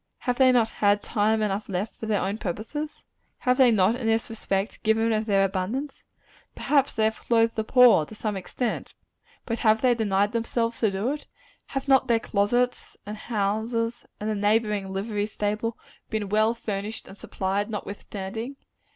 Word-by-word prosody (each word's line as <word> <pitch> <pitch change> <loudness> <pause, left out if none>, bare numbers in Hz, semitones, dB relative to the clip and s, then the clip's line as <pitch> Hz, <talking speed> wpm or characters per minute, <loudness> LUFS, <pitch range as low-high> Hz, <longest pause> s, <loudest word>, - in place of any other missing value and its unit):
Have 245 -1 -1
they 260 -1 +7
not 235 -3 +3
had 205 0 +2
time 215 0 +1
enough 205 0 -2
left 195 +3 -3
for 220 - -7
their 210 -2 +1
own 200 +3 -2
purposes? 225 - -5 0.4
Have 250 0 +2
they 260 -2 +7
not, 215 0 +3
in 245 -2 -3
this 225 0 +1
respect, 200 -2 -2
given 225 +1 +2
of 215 +1 -1
their 195 -2 +4
abundance? 215 +10 -3 0.5
Perhaps 280 -2 +1
they 220 - +1
have 220 0 +1
clothed 230 -1 +2
the 220 - 0
poor, 245 -7 +6
to - - -11
some 210 -1 -3
extent; 215 +5 -4 0.5
but 230 -1 -2
have 220 -1 +3
they 250 -1 +5
denied 205 -3 +1
themselves 230 0 -1
to 220 - +3
do 200 +6 -1
it? 295 0 -6 0.4
Have 270 0 -4
not 265 -1 +4
their 230 -1 +3
closets, 240 +4 0
and 210 +1 -5
houses, 225 +2 -2
and 210 - -4
the 220 - 0
neighboring 210 -1 +1
livery 205 +1 -2
stable, 210 +2 -2 0.3
been 215 -3 -2
well 215 +3 +3
furnished 215 -1 -5
and - - -11
supplied, 200 +1 -2
notwithstanding? 210 +3 -6
220 Hz, 175 wpm, -26 LUFS, 205-235 Hz, 0.5 s, they